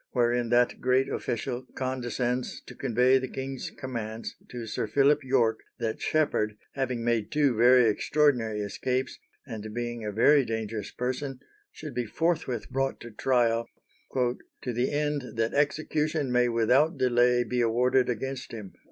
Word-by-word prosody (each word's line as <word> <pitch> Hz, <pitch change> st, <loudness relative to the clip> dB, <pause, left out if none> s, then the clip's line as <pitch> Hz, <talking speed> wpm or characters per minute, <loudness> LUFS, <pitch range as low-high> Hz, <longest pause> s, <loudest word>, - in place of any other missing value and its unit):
wherein 120 Hz, -1 st, +1 dB
that 120 Hz, +1 st, +2 dB
great 130 Hz, +1 st, +3 dB
official 125 Hz, +2 st, -3 dB
condescends 125 Hz, -1 st, -2 dB
to -, -, -10 dB
convey 130 Hz, 0 st, +3 dB
the 130 Hz, -, -4 dB
king's 135 Hz, 0 st, -5 dB
commands 115 Hz, -4 st, -5 dB
to 120 Hz, -2 st, -6 dB
Sir 110 Hz, 0 st, -3 dB
Philip 140 Hz, +5 st, +3 dB
Yorke 120 Hz, -4 st, +2 dB, 0.2 s
that 115 Hz, -3 st, -3 dB
Sheppard, 110 Hz, -9 st, +1 dB, 0.2 s
having 130 Hz, -3 st, -2 dB
made 115 Hz, -3 st, 0 dB
two 145 Hz, -5 st, +2 dB
very 120 Hz, +1 st, +6 dB
extraordinary 115 Hz, -2 st, +1 dB
escapes, 125 Hz, +5 st, -2 dB, 0.3 s
and 110 Hz, -1 st, -7 dB
being 120 Hz, -1 st, -3 dB
a 105 Hz, -, -3 dB
very 135 Hz, +7 st, +5 dB
dangerous 110 Hz, -2 st, -4 dB
person, 130 Hz, +2 st, -3 dB, 0.3 s
should 150 Hz, -3 st, -8 dB
be 125 Hz, 0 st, -2 dB
forthwith 145 Hz, -5 st, -1 dB
brought 135 Hz, 0 st, -1 dB
to 120 Hz, -, -9 dB
trial, 115 Hz, 0 st, +1 dB, 0.5 s
"to 125 Hz, 0 st, -2 dB
the 120 Hz, +2 st, 0 dB
end 145 Hz, -3 st, -1 dB
that 115 Hz, 0 st, 0 dB
execution 150 Hz, 0 st, 0 dB
may 125 Hz, 0 st, +3 dB
without 125 Hz, +8 st, +3 dB
delay 120 Hz, -1 st, +3 dB
be 125 Hz, +1 st, -1 dB
awarded 125 Hz, +2 st, +2 dB
against 130 Hz, +2 st, -4 dB
him." 105 Hz, -4 st, -8 dB
125 Hz, 145 wpm, -28 LUFS, 115-135 Hz, 0.5 s, very